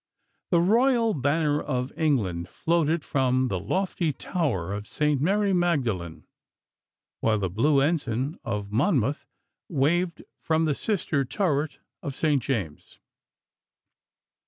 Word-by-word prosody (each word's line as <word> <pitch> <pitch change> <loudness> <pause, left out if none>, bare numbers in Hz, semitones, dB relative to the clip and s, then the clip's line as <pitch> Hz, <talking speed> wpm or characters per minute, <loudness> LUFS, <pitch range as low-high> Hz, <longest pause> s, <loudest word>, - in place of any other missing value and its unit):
The 170 - +4
royal 230 +3 +3
banner 145 +2 +1
of 130 -2 -3
England 100 - 0
floated 165 -1 0
from 130 -1 +1
the 95 - -1
lofty 180 - -1
tower 125 - -2
of 105 +1 -5
St. 150 -3 +1
Mary 200 +4 +2
Magdalene, 125 - 0 1.0
while 110 -1 +2
the 95 -4 -2
blue 140 - +3
ensign 140 -1 -1
of 100 0 -4
Monmouth 135 - +1 0.4
waved 170 +3 +1 0.2
from 160 0 +1
the 155 - +2
sister 155 -5 -1
turret 145 0 -1 0.2
of 140 - -5
St. 150 -3 +1
James. 105 - -4
145 Hz, 115 wpm, -26 LUFS, 120-170 Hz, 1.0 s, The